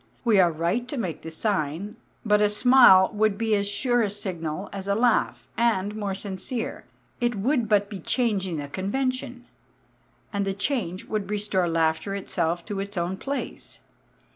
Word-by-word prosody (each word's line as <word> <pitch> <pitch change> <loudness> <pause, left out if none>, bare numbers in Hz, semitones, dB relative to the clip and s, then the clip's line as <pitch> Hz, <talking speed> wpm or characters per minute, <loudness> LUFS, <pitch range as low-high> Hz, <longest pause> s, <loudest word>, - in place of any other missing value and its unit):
We 220 -4 +5
are 175 -2 +5
right 170 +10 -1
to 280 - -5
make 185 -9 -3
the 165 - -7
sign, 185 +2 -2 0.3
but 210 -1 +4
a 210 - +4
smile 210 -4 +6
would 215 -1 +1
be 225 0 0
as 200 -1 +1
sure 240 +4 +1
a 210 - +1
signal 185 -3 -4
as 195 -1 -6
a 200 - +2
laugh, 235 +1 +1
and 210 -3 +1
more 205 -3 -2
sincere; 200 +4 -4 0.3
it 240 -2 0
would 235 +2 0
but 205 -1 +3
be 200 -2 -7
changing 195 -4 0
the 145 -1 -4
convention; 245 - -3 0.9
and 200 0 0
the 195 -1 -2
change 200 -5 -1
would 210 -3 -3
restore 205 -4 0
laughter 165 +4 0
itself 175 -3 -2
to 205 -3 -4
its 200 0 -5
own 175 +2 -1
place. 275 +8 -5
200 Hz, 165 wpm, -25 LUFS, 185-225 Hz, 0.9 s, smile